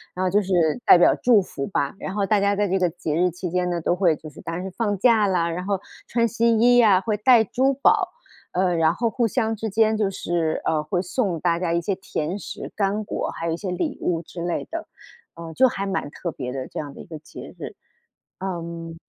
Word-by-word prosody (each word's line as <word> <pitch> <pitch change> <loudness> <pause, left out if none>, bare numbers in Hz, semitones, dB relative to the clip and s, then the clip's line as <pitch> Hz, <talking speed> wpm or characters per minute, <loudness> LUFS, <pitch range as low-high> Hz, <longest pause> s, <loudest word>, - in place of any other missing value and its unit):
然 185 - -1
后 - - +2
就 205 - +4
是 195 -1 -6 0.3
代 - - +8
表 175 - +5
祝 235 -4 +4
福 140 -6 -5
吧。 140 0 -1
然 190 - -5
后， 200 - +1
大 205 +1 +2
家 200 0 +2
在 205 0 +1
这 190 +1 +1
个 180 -2 +2
节 160 -3 -4
日 180 +2 +3
期 180 +1 -5
间 180 0 0
呢， 175 -1 -1
都 170 - 0
会 175 -4 +3
就 155 - -11
是 - - -13
当 165 - -5
然 180 +2 -4
是 190 - -5
放 205 -1 -1
假 220 -1 +4
啦， 175 -3 +1
然 175 +2 -3
后 200 0 -1 0.3
穿 235 0 +1
新 230 0 +2
衣 245 +1 +5
呀， 205 -6 +6
会 215 0 -1
戴 230 +1 +5
珠 260 +6 +1
宝， 275 - +3 0.4
呃， 180 -1 +1
然 165 0 +3
后 230 +4 0
互 235 0 0
相 225 -1 0
之 220 +1 -4
间 220 +1 +3
就 210 -2 +1
是， 170 -4 -1
呃， 155 -1 +1
会 175 +3 -1
送 185 -2 -1
大 170 0 +1
家 175 -2 -1
一 170 - +1
些 195 +3 -1
甜 185 -1 -4
食 - - -7
干 205 +1 0
果， 210 - -3
还 165 - -5
有 165 - 0
一 - - -3
些 185 0 -4
礼 180 - -2
物 170 -2 0
之 170 - -9
类 175 0 -2
的。 330 0 -5 0.5
呃， 165 -1 -8
就 260 +9 +5
还 195 -4 -3
蛮 195 -7 -2
特 170 +2 -5
别 125 -4 -5
的， 130 0 -5
这 - - -6
样 145 -2 -6
的 - - -12
一 - - -11
个 160 -3 -9
节 155 - -11
日， - - -7 0.6
嗯。 170 -3 -5
185 Hz, 265 characters per minute, -23 LUFS, 170-215 Hz, 0.6 s, 代